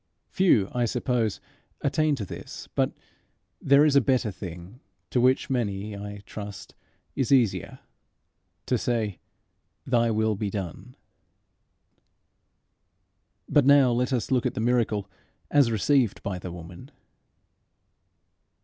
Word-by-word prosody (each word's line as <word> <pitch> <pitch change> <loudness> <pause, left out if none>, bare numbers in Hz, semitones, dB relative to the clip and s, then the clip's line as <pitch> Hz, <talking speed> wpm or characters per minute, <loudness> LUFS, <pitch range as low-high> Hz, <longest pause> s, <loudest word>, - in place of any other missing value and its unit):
Few, 170 - +3
I 120 -1 +1
suppose, 120 -2 -1 0.4
attain 155 +1 +1
to 110 -7 -5
this; - - -9
but - - +1 0.7
there 140 +2 +5
is 150 -2 +3
a 140 - +7
better 125 -4 +1
thing 90 +4 -9 0.3
which 130 +1 +3
to - - -3
many, 105 -3 -2
I 100 0 -8
trust, 105 -2 -8 0.4
is 135 - -1
easier 125 -7 +2 0.8
to - - 0
say, 110 -6 -1 0.7
Thy 120 -2 +2
will 110 0 +1
be 105 0 -3
done. 95 -5 -6 2.5
But 145 -3 +3
now 140 -3 +6
let 125 +2 0
us 125 0 -1
look 125 -2 +2
at - - -5
the - - -3
miracle 110 -4 +1 0.4
as 140 -5 +5
received 115 +1 +1
by 95 -2 -3
the 90 0 -7
woman. 85 +8 -10
115 Hz, 120 wpm, -26 LUFS, 100-130 Hz, 2.5 s, a